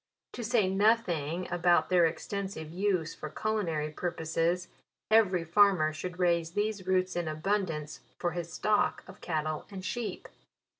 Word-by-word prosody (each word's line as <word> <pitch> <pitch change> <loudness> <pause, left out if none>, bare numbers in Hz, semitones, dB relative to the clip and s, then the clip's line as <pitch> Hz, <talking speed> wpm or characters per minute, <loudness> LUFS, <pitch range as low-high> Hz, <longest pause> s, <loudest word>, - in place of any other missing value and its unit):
To 245 - -6
say 225 -3 +2
nothing 185 -5 +1
about 175 0 +3
their 175 -2 +5
extensive 190 -1 -5
use 180 -3 0
for 155 - -7
culina 205 -1 -1
ry 150 0 -2
purposes, 170 +2 -1 0.4
every 195 -6 +4
farmer 170 -3 +4
should 175 +3 -6
raise 170 -2 +1
these 205 -2 -2
roots 185 -1 +1
in 175 -2 -1
abundance, 155 -2 -2 0.2
for 175 - -1
his 170 -1 -5
stock 210 +5 +1
of 185 +2 -13
cattle 155 -2 -2
and 190 -2 -7
sheep. 240 0 -4
180 Hz, 145 wpm, -30 LUFS, 160-200 Hz, 0.4 s, their